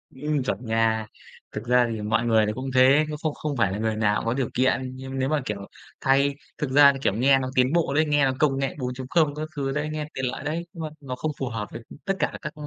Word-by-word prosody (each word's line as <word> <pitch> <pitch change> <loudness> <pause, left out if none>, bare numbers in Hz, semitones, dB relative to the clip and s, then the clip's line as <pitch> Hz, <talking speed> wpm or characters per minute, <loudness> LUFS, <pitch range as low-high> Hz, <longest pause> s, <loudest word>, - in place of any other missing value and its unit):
Ừm, 145 +1 -1
chuẩn 125 -1 -3
nha. 110 -1 +1 0.4
Thực 105 - -5
ra 125 -1 +4
thì 110 -2 -4
mọi 110 +3 0
người 110 -2 +4
thì 105 - -1
cũng 130 +2 -4
thế, 135 +4 +6
cũng 150 - -4
không 155 -1 -2
không 145 -2 -4
phải 105 -5 +2
là 100 - -3
người 110 0 -1
nào 105 -1 +2
cũng - - -7
có 115 - +1
điều 130 -2 -1
kiện, 130 0 +1
nhưng 130 0 -6
nếu 130 +1 0
mà, 155 -1 +1
kiểu, 105 - -3 0.4
thay 140 +1 +3 0.2
thực 150 - -2
ra 140 0 +7
thì 135 - -6
kiểu 100 - +1
nghe 135 +4 +4
nó 130 -1 -3
tiến 130 +3 +3
bộ 170 -5 +1
đấy, 155 +2 +3
nghe 145 -2 +3
nó 130 - +2
công 140 -3 +2
nghệ 135 -1 -2
4.0 130 +4 0
các 155 +1 -4
thứ 135 -2 -2
đấy, 150 +2 -2
nghe 155 -1 -3
tiện 135 - -2
lợi 125 - -4
đấy, 160 +4 -3
nhưng 165 - -6
mà 155 - -3
nó 130 -2 -5
không 155 +4 -2
phù 130 - -2
hợp 110 -2 -4
với, 115 - -7
ừm, - - -12
tất 195 - +1
cả - - 0
các 155 - -5
135 Hz, 280 wpm, -25 LUFS, 120-145 Hz, 0.4 s, ra